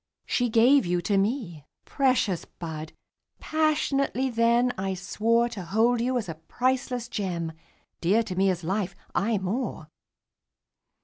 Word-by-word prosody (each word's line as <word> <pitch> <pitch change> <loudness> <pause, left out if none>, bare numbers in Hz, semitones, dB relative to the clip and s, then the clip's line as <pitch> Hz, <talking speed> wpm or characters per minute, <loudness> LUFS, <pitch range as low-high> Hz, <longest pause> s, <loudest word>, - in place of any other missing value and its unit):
She 245 -1 +1
gave 235 0 +5
you 175 0 +1
to 200 +2 +1
me. 195 - -1 0.2
Precious 255 - +1
bud! 160 -2 -7 0.5
Passionately 280 -4 +1
then 235 +2 +3
I 190 0 -2
swore 225 +5 +1
To 215 -4 -6
hold 225 +6 +2
you 255 +1 +1
as 225 - -3
a 165 - -4
priceless 250 -1 -1
gem, 175 -5 -3 0.5
Dear 205 +7 +3
to 185 -4 -5
me 190 +1 +3
as 180 -2 -2
life 190 +1 -2 0.2
aye 220 +2 +1
more! 190 -4 -3
220 Hz, 135 wpm, -26 LUFS, 185-245 Hz, 0.5 s, gave